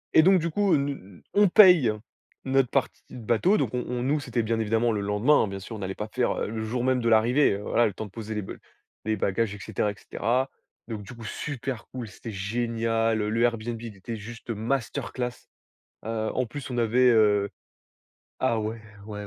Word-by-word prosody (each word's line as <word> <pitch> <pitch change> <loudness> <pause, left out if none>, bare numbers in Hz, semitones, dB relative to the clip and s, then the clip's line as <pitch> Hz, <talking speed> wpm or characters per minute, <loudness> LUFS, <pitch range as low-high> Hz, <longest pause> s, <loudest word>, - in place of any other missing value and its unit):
Et - - +9
donc 190 0 +6
du 170 - -1
coup, 200 +1 +2
heu, - - +7
n 140 0 0
n 100 -9 -9
on 205 -1 +5
paye 175 - +7 0.5
notre 135 -1 +2
partie - - -1
de - - -9
bateau, 175 - +3
donc - - -1
on 125 - 0
on 125 0 -2
nous, 145 +3 +1
c'était 120 -4 -2
bien 115 +1 0
évidemment 115 +2 +1
le 105 -2 -1
lendemain 105 +9 +3
hein, - - -1
bien 95 0 -5
sûr, 110 +4 -8
on 105 - -7
allait 95 0 -4
pas 105 - -4
faire, 125 +3 0
heu, - - -1
le 110 0 -4
jour 120 +3 -2
même 130 0 +2
de 115 - +1
l'arrivée, 115 +4 +4
heu, 100 - -4
voilà, 120 +3 +2
le 100 - -4
temps 110 - -6
de 100 - -12
poser 110 +1 -6
les 105 - -1
ba 95 - -7 0.5
les 110 -1 0
bagages 105 +2 0
et 100 - -11
cetera 105 - -1
et 100 - -10
cetera, 125 +6 -1 0.4
donc 110 -3 -5
du 105 - -10
coup 115 - -10
super 130 -1 -5
cool, 125 -3 -6
c'était 110 +3 -9
génial, 115 +2 0
heu, 105 - -1
le 115 +2 0
Airbnb 115 -1 -1
il 115 -3 -8
était 110 +5 -6
juste 115 +3 -10
masterclass. 120 +2 -2 0.7
Heu, 110 0 -2
en 130 - 0
plus 135 +4 -7
on 120 - -3
avait 120 +2 +4
heu 105 -3 +4 0.9
ah 115 -3 +1
ouais, 110 +1 -4 0.3
ouais 105 -1 -6
115 Hz, 225 wpm, -26 LUFS, 105-125 Hz, 0.9 s, Et